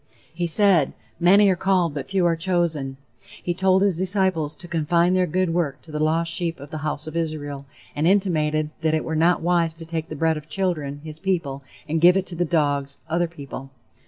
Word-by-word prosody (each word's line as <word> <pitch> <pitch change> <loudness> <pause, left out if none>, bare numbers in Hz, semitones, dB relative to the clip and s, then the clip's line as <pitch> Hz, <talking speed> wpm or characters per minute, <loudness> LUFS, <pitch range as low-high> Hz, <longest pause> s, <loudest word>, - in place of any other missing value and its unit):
He 175 +1 -2
said: 170 -4 +3 0.3
"Many 195 +4 +6
are 185 - +3
called 180 -3 +1
but 140 -3 -5
few 190 -2 +1
are 170 -1 +3
chosen;" 165 -6 -1 0.5
he 175 - -1
told 190 +1 +3
his 190 -4 +1
disciples 185 -5 0
to 175 - -10
confine 170 +2 +2
their 185 -1 +2
good 180 0 0
work 160 -6 -1
to 160 - -12
the 150 - -3
lost 165 +2 +1
sheep 170 -3 -2
of 140 +1 -11
the 155 - -4
House 150 0 -3
of 155 0 -8
Israel, 145 -4 -3 0.3
and 150 +3 +1
intimated 155 -6 +1
that 160 -1 +1
it 155 - -1
were 160 - -2
not 165 +2 +3
wise 170 -2 +1
to 165 0 -9
take 160 -1 -4
the 155 - -5
bread 160 +1 +1
of 150 +1 -10
children 150 -5 -1
(his 155 0 -9
people) 165 -8 -2 0.3
and 160 +1 -1
give 175 +2 +7
it 190 - -1
to 175 - -7
the 175 +1 0
dogs 145 -4 0
(other 175 +1 +1
people). 140 -4 -9
165 Hz, 215 wpm, -23 LUFS, 150-180 Hz, 0.5 s, give